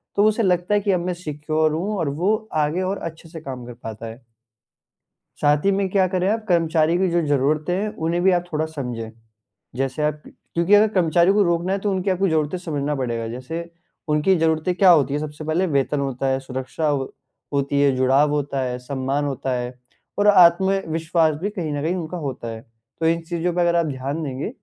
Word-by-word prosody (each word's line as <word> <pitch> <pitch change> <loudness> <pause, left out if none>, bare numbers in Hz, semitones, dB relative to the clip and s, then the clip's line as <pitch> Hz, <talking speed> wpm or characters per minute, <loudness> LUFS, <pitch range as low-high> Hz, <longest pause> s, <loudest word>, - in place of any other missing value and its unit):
तो 205 - +4
उसे 215 +2 +2
लगता 180 0 +1
है 205 - +4
कि 200 0 +1
अब 180 - +2
मैं 180 - -1
सिक्योर 155 -2 -1
हूँ 195 +6 -2
और 165 -5 -1
वो 205 +4 +3 0.3
आगे 155 +5 -1
और 190 +2 -1
अच्छे 160 0 -17
से 160 -1 -9
काम 130 -4 -7
कर 120 - -8
पाता 115 -2 -8
है। 115 +3 -10 1.2
साथ 145 0 +3
ही 200 - +4
में 195 0 0
क्या 190 0 +2
करें 185 0 +1
आप 220 +1 0
कर्मचारी 165 -2 +2
की 190 0 +2
जो 175 0 +1
ज़रूरतें 145 +4 +1
हैं, 205 +3 -1
उन्हें 170 +2 -1
भी 190 - +5
आप 175 -1 +1
थोड़ा 155 0 0
समझे, 125 -7 -5 0.6
जैसे 135 +2 -2
आप 150 0 -1
क्योंकि 170 +4 0
अगर 215 +1 +6
कर्मचारियों 175 +1 +3
को 210 - +4
रोकना 170 0 +1
है 195 - 0
तो 205 +1 -1
उनकी 190 0 -1
आपको 190 +1 +1
ज़रूरतें 155 +1 0
समझना 150 -4 -2
पड़ेगा, 120 -4 -2
जैसे 160 +9 -6 0.4
उनकी 150 +5 +3
ज़रूरतें 160 +2 +1
क्या 185 0 +5
होती 145 -5 +4
है? 145 - -1
सबसे 150 0 -6
पहले 160 +5 +1
वेतन 140 +1 +1
होता 135 -1 -2
है, 135 0 +1
सुरक्षा 130 +4 -3 0.6
होती 140 0 0
है, 140 -1 +4
जुड़ाव 135 +3 +3
होता 145 -2 -1
है, 125 -1 -2
सम्मान 135 +2 -2
होता 135 -1 -3
है 125 0 -3 0.5
और 205 - +3
आत्मविश्वास 170 -3 +4
भी 205 - -1
कहीं 175 -7 -4
न 145 -1 -2
कहीं 165 +4 0
उनका 175 0 -5
होता 135 -6 -5
है, 115 -1 -6 0.4
तो 165 - +1
इन 165 +1 +2
चीज़ों 175 0 -1
पे 175 - -1
अगर 170 0 +3
आप 170 -1 +2
ध्यान 140 +3 -3
देंगे, 135 0 -4
160 Hz, 210 wpm, -22 LUFS, 140-180 Hz, 1.2 s, अगर